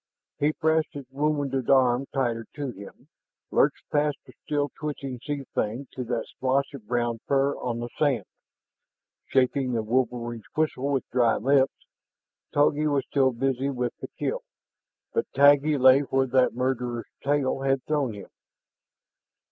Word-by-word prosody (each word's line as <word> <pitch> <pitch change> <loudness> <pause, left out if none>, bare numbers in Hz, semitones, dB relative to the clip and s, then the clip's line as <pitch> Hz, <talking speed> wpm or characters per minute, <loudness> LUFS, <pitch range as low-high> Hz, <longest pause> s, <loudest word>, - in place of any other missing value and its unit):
He 150 +1 +3
pressed 160 0 +1
his 140 -2 -7
wounded 140 -3 -1
arm 130 -1 +4
tighter 120 -4 -1
to 145 -3 -3
him, 100 -3 -13 0.4
lurched - - +2
past 150 -1 +1
the - - -15
still 145 -1 -1
twitching 140 -4 -4
sea 145 -1 -3
thing 120 +6 -2
to 130 - -5
that 120 -1 -2
splotch 135 +2 -1
of 120 -7 -10
brown 120 -1 0
fur 140 0 +2
on 120 -2 -3
the 120 - -4
sand, 135 -10 +2 1.0
shaping 130 0 +1
the 115 -2 0
wolverine's 120 -1 -1
whistle 145 -3 0
with 135 - -1
dry 120 -3 +3
lips. 135 +2 +2 0.7
Togi 145 +1 +3
was 140 -2 +1
still 135 -2 +2
busy 135 +2 -1
with 125 -3 -2
the - - -6
kill, - - -2 0.7
but - - -1
Taggi 145 +2 +5
lay 130 +1 +7
where 135 -1 +1
that 130 -2 +2
murderous 125 -2 -1 0.2
tail 140 -1 +1
had 135 -1 0
thrown 145 -7 0
him. 100 -2 -10
135 Hz, 150 wpm, -26 LUFS, 125-145 Hz, 1.0 s, lay